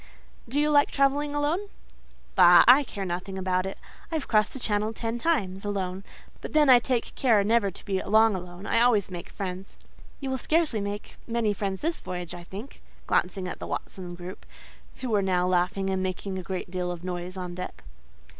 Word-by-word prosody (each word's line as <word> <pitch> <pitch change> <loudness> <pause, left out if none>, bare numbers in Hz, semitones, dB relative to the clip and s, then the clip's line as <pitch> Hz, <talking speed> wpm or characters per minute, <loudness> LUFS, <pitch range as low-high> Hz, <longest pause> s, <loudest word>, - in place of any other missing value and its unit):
Do 275 +5 0
you 300 0 +2
like 285 -1 +5
travelling 285 +1 +1
alone?" 320 +8 0 0.6
"Bah! 175 -2 +8
I 260 +4 +8
care 205 -6 -5
nothing 180 +2 -4
about 185 0 0
it. 195 - -6 0.3
I - - -1
have 305 - -2
crossed 215 -1 +2
the 270 - -5
Channel 215 -1 0
ten 230 +1 -3
times, 200 - 0
alone; 195 -2 -3 0.4
but - - -7
then 300 -3 +6
I 245 - +9
take 240 -1 -1
care 225 -6 +3
never 220 -1 +3
to 185 - -11
be 190 -2 -1
long 220 +1 +4
alone: 180 +1 -7
I - - +2
always 220 -6 +3
make 175 -1 -7
friends." 185 -1 -6 0.4
"You 270 -2 -3
will 260 - -1
scarcely 310 -7 +1
make 205 +1 -5
many 230 -3 +1
friends 195 -1 -3
this 330 +1 -1
voyage, 180 -2 -6
I 175 - -8
think" 205 +10 -9 0.2
(glancing 185 +1 0
at - - -6
the - - -6
Watson 180 -2 -5
group, 180 +2 -9 0.6
who 255 - -3
were 205 -2 +3
now 180 -2 +1
laughing 185 +2 +1
and 190 0 0
making 190 +1 -3
a - - -4
great 180 0 -5
deal 180 -1 -2
of 175 -1 -7
noise 180 +1 -5
on 180 -1 -5
deck). 180 +1 -7
200 Hz, 200 wpm, -27 LUFS, 185-240 Hz, 0.6 s, I